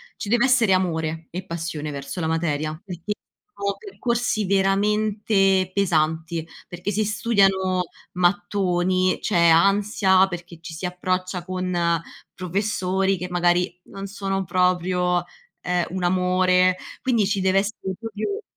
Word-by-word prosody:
ci 205 - -6
dev'essere 240 -3 +4
amore 160 -3 0
e 185 +2 -5
passione 160 -3 -4
verso 140 +5 -5
la 160 - -1
materia, 155 -1 -1
perché 180 +2 -6 0.4
sono 200 0 -2
percorsi 240 - -1
veramente 195 0 +2
pesanti, 165 -3 0 0.2
perché 180 +3 -4
si 215 - +1
studiano 195 -4 +2 0.3
mattoni, 185 0 +1
c'è 170 -5 +3
ansia 195 +2 +4
perché 175 -1 -8
ci 170 -1 -8
si 170 +3 -5
approccia 185 0 -2
con 180 -2 -1 0.3
professori 190 0 0
che 180 - -5
magari 175 0 +1
non 195 0 -8
sono 195 -1 -2
proprio, 180 0 +1 0.4
ehm, 180 -1 0
un 185 -1 -3
amore. 185 0 +3 0.2
Quindi 235 -5 +2
ci 200 0 0
deve 190 +1 +3
essere 195 -2 -3
proprio 225 - -4
185 Hz, 125 wpm, -23 LUFS, 175-200 Hz, 0.4 s, dev'essere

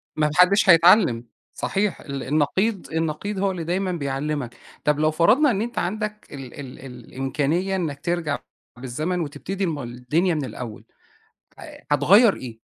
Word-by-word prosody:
ما 150 -1 +2
ما - - -1
حدش 190 +2 +5
هيتعلم. 170 - +6 0.3
صحيح، 200 0 -1
ال 140 -2 -6
النقيض 180 - 0
النقيض 165 +5 -2
هو 195 0 +1
اللي 175 -3 -5
دايمًا 185 +3 -1
بيعلمك. 140 -4 -3 0.3
طب، 150 0 +1
لو 155 0 +3
فرضنا 240 - +4
إن 200 -1 -1
أنت 240 +1 -5
عندك 210 +3 -3
ال 135 -4 -9
ال 135 -2 -9
ال 135 - -11 0.2
الإمكانية 150 +8 -1
إنّك 155 -6 -3
ترجع 165 -3 -2 0.4
بالزمن 150 +8 -3
وتبتدي 175 +6 -4
ما 150 -5 -3
الدنيا 135 +9 -1
من 145 -3 -2
الأول 115 -2 -8 0.8
ه - - -9 0.3
هتغيّر 195 - +5
إيه؟ 125 - -7
160 Hz, 155 wpm, -23 LUFS, 140-190 Hz, 0.8 s, هيتعلم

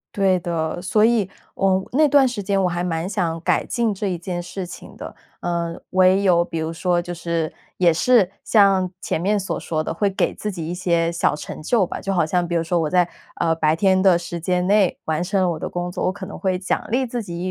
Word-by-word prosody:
对 190 -2 +3
的， 170 0 -3
所 210 +4 +3
以， 225 -5 +2 0.2
呃， 195 - +1
我 190 - -9
那 300 +4 +4
段 280 -1 +5
时 240 -4 -3
间 195 0 0
我 180 - +3
还 175 0 -2
蛮 165 0 -2
想 175 -5 -1
改 - - +1
进 235 -4 0
这 200 +1 -3
一 180 -2 -1
件 175 +1 -4
事 180 +2 -6
情 180 - -11
的， - - -8 0.3
呃， 170 -1 -2
唯 185 +1 +4
有 175 -3 +4
比 165 -1 -6
如 160 +1 -2
说 175 +1 +1
就 175 0 -5
是 170 -2 -2 0.2
也 175 -3 +4
是 200 0 +3
像 195 -4 +4
前 160 - -2
面 205 +3 +1
所 195 - -3
说 155 -1 -2
的， - - -3
会 200 +3 +1
给 195 - 0
自 210 - -4
己 165 -4 -5
一 175 - -3
些 170 -2 +1
小 170 - +1
成 150 - -8
就 195 +3 +2
吧， - - -6
就 195 - -2
好 175 -4 +2
像 175 +2 0
比 170 - -2
如 165 - +1
说 170 +1 0
我 160 -2 0
在， 180 0 +3 0.3
呃， 165 -1 +1
白 160 -1 +2
天 190 +1 +3
的 185 -3 +5
时 170 0 -6
间 180 +2 0
内 200 -1 +3
完 160 +2 -1
成 195 +2 0
了 - - +2
我 160 - -4
的 - - -4
工 175 0 -3
作， - - -3
我 - - +2
可 190 - -8
能 - - -8
会 185 -2 0
奖 185 - -2
励 255 +4 +1
自 240 0 -4
己 170 -4 -7
180 Hz, 265 characters per minute, -21 LUFS, 170-195 Hz, 0.3 s, 段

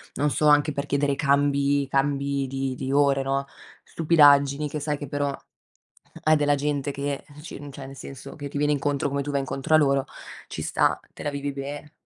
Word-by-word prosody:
non 150 - +1
so 150 +1 +1
anche 145 0 +4
per 140 +1 -3
chiedere 140 0 +1
cambi, 140 -1 +2
cambi 140 0 0
di 135 0 -3
di 130 +1 -4
ore, 140 -1 +3
no, 135 +1 -1 0.4
stupidaggini 145 -3 +4
che 150 +1 -5
sai 150 0 -1
che 145 - -7
però, 145 +1 -1 0.9
hai 155 0 +5
della 145 0 +2
gente 145 0 -1
che 140 0 -3 0.2
ci 165 - -8
cioè 135 0 -9
nel 135 - -10
senso 135 0 -9
che 145 -2 -7
ti 145 - -5
viene 150 +1 +2
incontro, 145 0 0
come 140 +1 -1
tu 145 - -4
vai 140 - +1
incontro 135 +3 0
a - - +8
loro, 140 -3 +3 0.4
ci - - -6
sta, - - +1
te - - -9
la 145 - -1
vivi 140 0 -4
bene. 145 +2 -7
140 Hz, 200 wpm, -25 LUFS, 140-145 Hz, 0.9 s, a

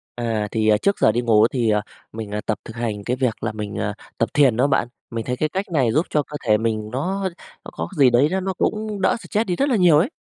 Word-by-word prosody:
À, 115 -3 -1
thì, 110 -1 0
ờ, 105 - +5
trước 200 - 0
giờ - - +5
đi 120 - 0
ngủ 110 -2 +4
thì, 120 -3 0
ờ, 105 -1 +2 0.3
mình, 110 -2 -6
ờ, 105 - -2
tập 110 - -1
thực 110 - -9
hành 110 -3 -3
cái 125 - -1
việc 125 -4 -1
là 115 - -1
mình, 105 -1 -6
à, - - -1 0.2
tập - - +1
thiền 135 -6 +4
đó 130 +3 +3
bạn, 135 -4 +1 0.2
mình 115 -1 -4
thấy 125 0 -2
cái 155 - 0
cách 190 +4 -2
này 130 -7 +2
giúp 160 - +2
cho 150 - +1
cơ 150 +1 -7
thể 105 -1 +5
mình 110 -1 -2
nó 190 +9 -2 0.4
nó - - -8
có 80 +1 -4
gì 135 -3 +6
đấy 125 +4 +4
nó 190 - +1
nó 190 0 -2
cũng 215 +1 -2
đỡ - - +3
stress 220 0 -1
đi 180 - 0
rất 280 +9 +1
là 255 - +2
nhiều 175 -7 +5
ấy. 170 +10 +2
125 Hz, 280 wpm, -22 LUFS, 110-175 Hz, 0.4 s, gì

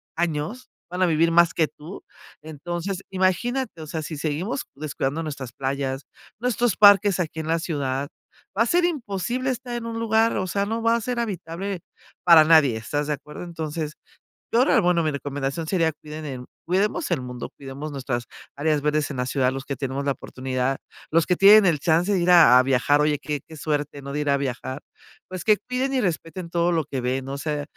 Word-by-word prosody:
años, 170 +8 -2 0.2
van 180 +1 -4
a 185 - +6
vivir 165 0 +3
más 170 0 +5
que 160 -2 +1
tú. 165 +6 -11 0.4
Entonces, 175 +5 -5
imagínate, 190 +2 0
o 155 - -8
sea, 160 +1 -4
si 155 0 -6
seguimos 165 - -2
descuidando 150 +1 -3
nuestras 140 -5 -6
playas, 135 0 -3 0.3
nuestros 240 -2 0
parques 200 -2 +6
aquí 160 -1 -4
en 160 - -4
la 165 0 +1
ciudad, 140 -4 -2 0.5
va 230 - +5
a - - -1
ser 345 +7 +2
imposible 255 - -1
estar 245 0 -5
en 235 -1 -4
un 230 0 -4
lugar, 225 0 +2
o 185 - -1
sea, 200 +3 0
no 225 +2 -2
va 230 0 +4
a - - -4
ser 245 +2 -3
habitable 190 -3 -4 0.5
para 165 -3 +9
nadie, 155 -6 +5
¿estás 145 +7 -3
de 150 - 0
acuerdo?, 150 +4 -8
entonces, 160 -2 -4 0.6
yo 240 +2 +5
rea 270 - +3
bueno, 175 -2 +2
mi 155 - +1
recomendación 140 +2 -3
sería 165 -2 +2
cuiden 155 +1 -9
en 130 -3 -6 0.2
cuidemos 195 - 0
el 160 -6 +1
mundo, 125 -1 -7
cuidemos 140 +2 -7
nuestras 130 -4 -3 0.3
áreas 150 0 0
verdes 150 0 0
en 140 - -5
la 125 0 -1
ciudad, 130 0 +1
los 135 0 -5
que 140 - -3
tenemos 135 0 -3
la 140 - +1
oportunidad, 130 0 -3 0.3
los 165 0 +3
que 180 - +3
tienen 205 +2 +7
el 160 -5 +2
chance 170 +6 +2
de 185 - +2
ir 175 +1 +2
a 165 -8 +8
a - - +4
viajar, 135 +3 +2
oye, 150 -1 +2
qué 145 0 -4
qué 160 - -12
suerte, 145 -1 -2
¿no?, 140 0 -7
de 150 - -2
ir 145 -1 0
a 140 - +4
viajar, 130 0 -4 0.5
pues, 185 -2 -6
que 215 -1 +5
cuiden 255 +2 -2
y 265 - +1
respeten 170 -2 -3
todo 170 0 +1
lo 165 -3 +1
que 135 -1 -4
ven, 130 +2 -2
o 140 - -3
sea, 150 0 -2
160 Hz, 205 wpm, -24 LUFS, 140-190 Hz, 0.6 s, para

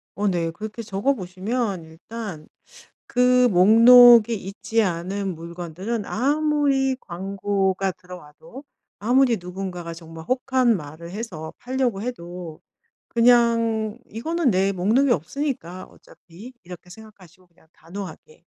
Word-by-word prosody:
어 205 +1 -1
네. 170 -3 -1
그렇게 215 +6 -7
적어 210 +5 -1
보시면 195 -1 -3
일단 165 0 -9 0.6
그 250 0 +3
목록이 230 +4 +7
있지 215 +3 -2
않은 190 +1 -3
물건들은 175 +6 -6
아무리 280 +1 +1
광고가 195 +1 -2
들어와도 180 - -13 0.4
아무리 245 +1 +3
누군가가 180 -1 -6
정말 165 -1 -11
혹한 255 -2 +2
말을 160 +1 -10
해서 180 -7 -7
팔려고 250 -5 -2
해도 175 -8 -7 0.5
그냥 230 -2 +2
'이거는 315 +6 -1
내 190 +1 +2
목록에 220 +9 +2
없으니까, 185 - -4
어차피.' 190 +9 -15
이렇게 180 0 -12
생각하시고 185 -4 -16
그냥 170 -1 -28
단호하게 195 - -11
200 Hz, 270 characters per minute, -23 LUFS, 180-240 Hz, 0.6 s, 목록이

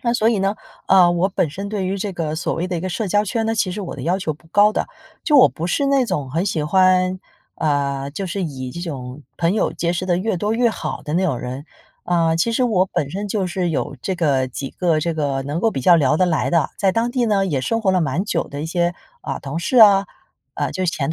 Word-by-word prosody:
那 235 - +2
所 225 -1 +3
以 225 - +1
呢， 195 +2 +1 0.3
呃， 185 -2 +6
我 175 +3 +1
本 180 -4 0
身 195 +6 -6
对 200 -3 -2
于 195 - -1
这 195 0 -3
个 160 -3 -3
所 165 - -2
谓 175 +2 -2
的 180 - -3
一 165 - -3
个 185 - -3
社 210 +4 -2
交 205 +3 +2
圈 225 +2 -1
呢， 225 - 0
其 200 -4 0
实 195 +3 -5
我 185 - -6
的 - - -7
要 180 +4 0
求 170 -5 -2
不 155 +2 -19
高 205 +4 +4
的， - - -1 0.4
就 300 -3 +3
我 255 - +8
不 165 - -6
是 280 +10 0
那种 250 - +1
很 165 +5 0
喜 165 -5 -1
欢 185 +2 +3 0.4
呃， 140 -2 -1
就 195 +6 -5
是 185 +2 -3
以 130 -6 -5
这 170 - -7
种 140 -4 -6
朋 170 +1 +1
友 - - 0
结 170 0 -1
识 180 +1 -2
得 175 -1 +2
越 190 +1 -1
多 210 +5 -1
越 240 0 +3
好 155 -9 -5
的 150 +1 -5
那 185 +2 +2
种 140 -9 0
人。 130 +4 -6 0.4
呃， 165 -2 +2
其 170 +8 +1
实 250 +2 +2
我 195 -6 +2
本 145 -6 -2
身 205 +2 -4
就 195 -2 -1
是 180 -1 -1
有 145 -2 -3
这 190 - -1
个 135 -6 +1
几 135 +2 -6
个 170 -4 0
这 165 +2 -1
个 140 -3 -1
能 145 +5 -3
够 225 - +2
比 135 - -3
较 175 +7 +6
聊 150 -2 +3
得 185 - +3
来 165 -3 0
的， 165 -4 +2
在 195 - +3
当 230 +4 0
地 250 -3 +1
呢 200 -3 +2
也 145 -8 -1
生 230 - -1
活 195 - +2
了 185 - +2
蛮 160 +5 -1
久 - - -2
的 145 +1 -6
一 - - -3
些， 175 +1 0 0.3
啊， - - -4
同 140 +2 -6
事 255 - -1
啊 200 -4 +7 0.5
呃， - - -2
就 185 - -2
前 160 -3 -1
180 Hz, 285 characters per minute, -20 LUFS, 155-200 Hz, 0.5 s, 我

